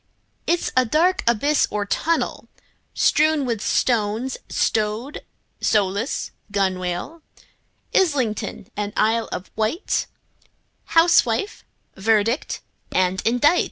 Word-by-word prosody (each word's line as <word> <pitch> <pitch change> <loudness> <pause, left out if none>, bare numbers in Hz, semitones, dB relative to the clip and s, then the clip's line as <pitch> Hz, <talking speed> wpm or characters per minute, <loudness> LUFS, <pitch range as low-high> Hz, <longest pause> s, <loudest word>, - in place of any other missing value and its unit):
It's 345 0 +1
a 255 - +5
dark 325 +10 +2
abyss 285 +6 +3
or 210 -1 -2
tunnel, 330 +10 -1 0.5
Strewn 305 -2 +3
with 230 -4 -2
stones, 230 +2 0
like - - +1
rowlock, 215 -1 -2 0.2
gunwale, 190 - -2 0.7
Islington 255 - 0
and 205 0 -3
Isle 225 +1 +2
of 180 - -6
Wight, 220 - -1 0.8
Housewife, 330 - +3 0.3
verdict 220 +5 +1 0.3
and 185 0 +1
indict! 270 +9 +4
230 Hz, 90 wpm, -22 LUFS, 205-295 Hz, 0.8 s, a